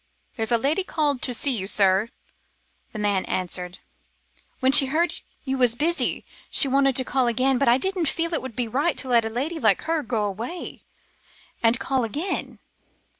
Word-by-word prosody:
"There's 225 -1 -3
a 235 - +4
lady 295 +10 0
called 295 -7 -1
to 255 - -1
see 255 +2 +1
you, 190 -3 -2
sir," 195 +2 +3 0.8
the - - -8
man 205 -2 0
answered. 180 0 -3 0.8
"When 260 0 +2
she 275 -1 +7
heard 325 +6 0 0.3
you 265 -1 -2
was 245 -2 +3
busy, 335 +6 0 0.2
she 280 - +5
wanted 275 0 +2
to 260 - +4
call 260 -1 0
again, 255 +2 +1
but 275 - +1
I 240 +1 +5
didn't 360 0 -1
feel 335 +1 -2
it 320 - 0
would 260 -4 -8
be 245 -2 -2
right 280 +9 -1
to 265 - -2
let 235 -2 +3
a - - -2
lady 285 +9 -4
like 215 -7 +2
her 325 -1 -1
go 225 -5 -2
away, 230 - -6 0.8
and 230 +1 +3
call 265 -2 -1
again." 300 - -4
255 Hz, 185 wpm, -23 LUFS, 225-290 Hz, 0.8 s, she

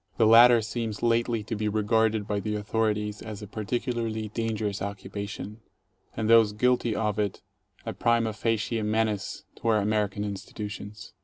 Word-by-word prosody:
(The 115 - +4
latter 115 +1 +7
seems 110 0 -4
lately 115 -1 +1
to 110 +2 -4
be 105 0 -1
regarded 110 0 +1
by 105 -1 -1
the 105 +1 -2
authorities 105 0 -1
as 105 -1 -7
a - - -7
particularly 110 0 -3
dangerous 110 -3 -2
occupation, 100 +2 -6 0.6
and 110 -1 -1
those 115 -2 +6
guilty 120 0 +1
of 105 -1 -1
it 105 -2 -2 0.4
a - - -3
prima 115 -2 +1
facie 115 +1 -1
menace 105 -1 -1
to - - -5
our 110 -1 +4
American 105 -1 0
institutions.) 105 +1 -7
110 Hz, 150 wpm, -27 LUFS, 105-115 Hz, 0.6 s, latter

